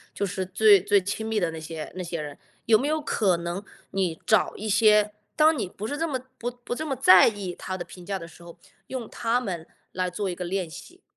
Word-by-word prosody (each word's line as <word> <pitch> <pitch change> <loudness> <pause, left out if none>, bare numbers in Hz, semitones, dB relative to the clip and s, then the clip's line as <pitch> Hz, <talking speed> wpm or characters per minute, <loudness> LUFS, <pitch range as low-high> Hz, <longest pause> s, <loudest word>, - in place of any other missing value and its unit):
就 200 - 0
是 190 0 -3
最 200 +1 +6
最 205 +1 +4
亲 200 +3 -4
密 220 -1 0
的 175 -4 0
那 160 - -7
些 160 0 -7
那 185 - -4
些 170 -1 -4
人， 145 -1 -7 0.3
有 220 -2 +5
没 275 - -1
有 310 +1 +1
可 205 - +1
能 170 +3 -4 0.3
你 180 -4 -1
找 215 - +3
一 215 - -5
些 210 0 +4 0.2
当 315 +1 +5
你 210 -9 -3
不 200 - -7
是 285 - -3
这 325 +3 -1
么 270 -5 -2 0.2
不 240 - -2
不 245 0 -7
这 310 +5 -4
么 275 - -1
在 185 -8 +7
意 200 -5 -3
他 185 +1 -5
的 175 - -6
评 180 - -12
价 195 +2 -3
的 165 -3 -9
时 170 +1 -16
候， 170 0 -12 0.3
用 255 -4 -5
他 230 +2 0
们 180 -9 -5 0.2
来 185 0 -1
做 200 +3 -3
一 180 - -2
个 180 - -5
练 185 0 -2
习？ 345 - -12
195 Hz, 265 characters per minute, -26 LUFS, 175-230 Hz, 0.3 s, 在